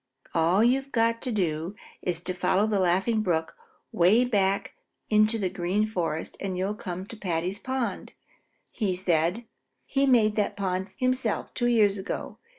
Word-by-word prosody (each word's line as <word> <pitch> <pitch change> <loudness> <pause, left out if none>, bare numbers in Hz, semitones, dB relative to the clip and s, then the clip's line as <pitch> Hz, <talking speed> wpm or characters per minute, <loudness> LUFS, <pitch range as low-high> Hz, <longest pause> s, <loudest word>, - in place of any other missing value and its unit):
"All 170 +5 +3
you've 270 +3 +2
got 230 0 +1
to 255 - -2
do 175 -2 -1 0.3
is 175 -2 -2
to 185 - 0
follow 185 +3 +2
the 215 -2 +1
Laughing 190 +5 +2
Brook 165 -5 -1 0.4
way 205 +8 +4
back 200 -4 0 0.4
into 215 +1 +4
the 195 -4 0
Green 185 +3 0
Forest, 170 -7 -3
and 190 -2 -3
you'll 190 +3 -1
come 185 -3 -6
to 225 - -10
Paddy's 180 -1 -2
pond," 260 -2 -3 0.8
said 175 0 +1 0.5
he. 275 - -1
"He 275 - +4
made 225 -5 +4
that 210 - 0
pond 190 -1 -1
himself 255 -4 -1
two 240 - 0
years 210 -4 +3
ago. 190 - -5
200 Hz, 155 wpm, -27 LUFS, 180-225 Hz, 0.8 s, way